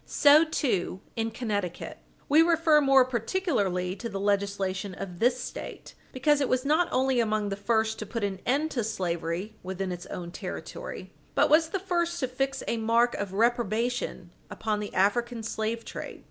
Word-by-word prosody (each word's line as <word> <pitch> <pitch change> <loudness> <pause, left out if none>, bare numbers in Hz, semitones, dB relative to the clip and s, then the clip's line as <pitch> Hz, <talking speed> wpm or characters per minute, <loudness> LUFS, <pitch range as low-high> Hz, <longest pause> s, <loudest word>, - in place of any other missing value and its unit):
So, 295 +2 +6
too, 245 - -1 0.2
in 225 0 -1
Connecticut. 205 -6 -4 0.3
We 300 +3 +6
refer 325 -2 +4
more 270 -2 +6
particularly 215 - -1
to 235 - -5
the 195 -2 -4
legislation 200 -1 -1
of 180 -2 -7
this 245 +2 +3
State, 250 - -7 0.2
because 290 +3 +2
it 275 - +1
was 255 +1 +1
not 315 +5 +3
only 260 -1 +2
among 215 -2 +1
the 195 - -2
first 220 +2 0
to 215 - -5
put 230 0 -4
an 195 -2 -2
end 295 +5 +1
to 240 - -1
slavery 180 0 -3
within 190 0 -4
its 175 -1 -6
own 175 -1 -6
territory, - - -7 0.2
but - - +3
was 320 +1 +5
the 390 - -1
first 345 -2 -1
to 260 - +1
fix 270 +2 -2
a 235 - 0
mark 230 +2 +3
of 200 -2 -4
reprobation 230 -3 0 0.2
upon 215 -2 -2
the 210 - -5
African 230 +4 +1
slave 220 +1 -3
trade. - - -7
230 Hz, 175 wpm, -28 LUFS, 200-270 Hz, 0.3 s, So